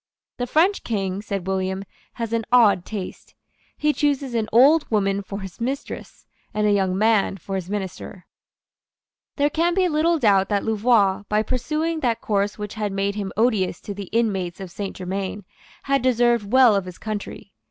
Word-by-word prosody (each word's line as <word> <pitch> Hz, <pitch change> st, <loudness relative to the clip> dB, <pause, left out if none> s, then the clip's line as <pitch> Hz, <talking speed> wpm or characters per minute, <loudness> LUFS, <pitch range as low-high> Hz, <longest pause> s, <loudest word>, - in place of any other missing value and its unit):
"The 245 Hz, -, -2 dB
French 350 Hz, -, +2 dB
King," 195 Hz, -3 st, -2 dB
said 200 Hz, -4 st, -4 dB
William, 190 Hz, 0 st, -2 dB, 0.3 s
"has 230 Hz, -1 st, -4 dB
an 230 Hz, 0 st, +1 dB
odd 215 Hz, -7 st, +5 dB
taste. 200 Hz, -4 st, -7 dB, 0.4 s
He 300 Hz, 0 st, +2 dB
chooses 280 Hz, -4 st, 0 dB
an 220 Hz, -2 st, -1 dB
old 285 Hz, +7 st, +5 dB
woman 200 Hz, -2 st, +1 dB
for 200 Hz, 0 st, -7 dB
his 190 Hz, +2 st, -9 dB
mistress, 270 Hz, +4 st, -5 dB, 0.3 s
and 210 Hz, 0 st, +1 dB
a 210 Hz, -, +3 dB
young 190 Hz, -2 st, +1 dB
man 215 Hz, -2 st, +2 dB
for 195 Hz, +2 st, -8 dB
his 190 Hz, -2 st, -3 dB
minister." 190 Hz, -2 st, -5 dB, 1.1 s
There 290 Hz, 0 st, +1 dB
can 340 Hz, +3 st, +1 dB
be 375 Hz, -1 st, +3 dB
little 330 Hz, +1 st, +2 dB
doubt 200 Hz, -8 st, +3 dB
that 205 Hz, -2 st, 0 dB
Louvois, 220 Hz, -3 st, +2 dB
by 210 Hz, +1 st, +2 dB
pursuing 305 Hz, +7 st, -2 dB
that 240 Hz, -6 st, 0 dB
course 205 Hz, -1 st, -1 dB
which 210 Hz, -1 st, -6 dB
had 210 Hz, -2 st, -3 dB
made 195 Hz, +1 st, -1 dB
him 200 Hz, -2 st, -4 dB
odious 215 Hz, -6 st, +1 dB
to 205 Hz, -, -6 dB
the 200 Hz, 0 st, -6 dB
inmates 195 Hz, -5 st, -1 dB
of 190 Hz, -2 st, -7 dB
Saint 200 Hz, +1 st, -5 dB
Germains, 190 Hz, +1 st, -4 dB, 0.4 s
had 275 Hz, -1 st, +1 dB
deserved 240 Hz, -4 st, +2 dB
well 255 Hz, -4 st, +6 dB
of 195 Hz, -2 st, 0 dB
his 180 Hz, -1 st, -9 dB
country. 210 Hz, -2 st, -6 dB
210 Hz, 175 wpm, -23 LUFS, 195-245 Hz, 1.1 s, well